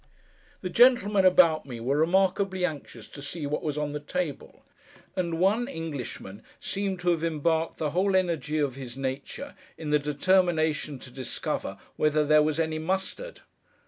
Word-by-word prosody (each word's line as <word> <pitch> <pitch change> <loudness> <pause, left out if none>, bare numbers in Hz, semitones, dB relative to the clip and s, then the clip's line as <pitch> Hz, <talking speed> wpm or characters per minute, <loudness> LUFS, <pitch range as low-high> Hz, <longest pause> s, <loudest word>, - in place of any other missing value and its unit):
The 185 - -3
gentlemen 210 -4 +5
about 170 -5 +5
me 120 -3 -6
were 130 +5 0
remarkably 190 +3 +2
anxious 140 -9 -6
to 140 - -10
see 145 +2 -5
what 145 +1 -2
was 150 -2 -3
on 150 -1 -1
the 150 - -3
table; 150 0 -5 0.5
and 170 -3 -1
one 205 +7 +2
Englishman 145 - -6 0.2
seemed 195 -2 -3
to 175 0 +2
have 165 -1 -1
embarked 160 0 0
the 150 -2 -1
whole 190 +4 +2
energy 165 -4 0
of 145 -4 0
his 130 -1 -8
nature 135 - -5 0.2
in 155 -2 -4
the 150 - +4
determination 155 0 +1
to 125 - -12
discover 130 -1 -3 0.2
whether 150 0 +2
there 155 +1 +5
was 155 +1 0
any 160 -1 0
mustard. 190 - -3
160 Hz, 160 wpm, -27 LUFS, 145-185 Hz, 0.5 s, gentlemen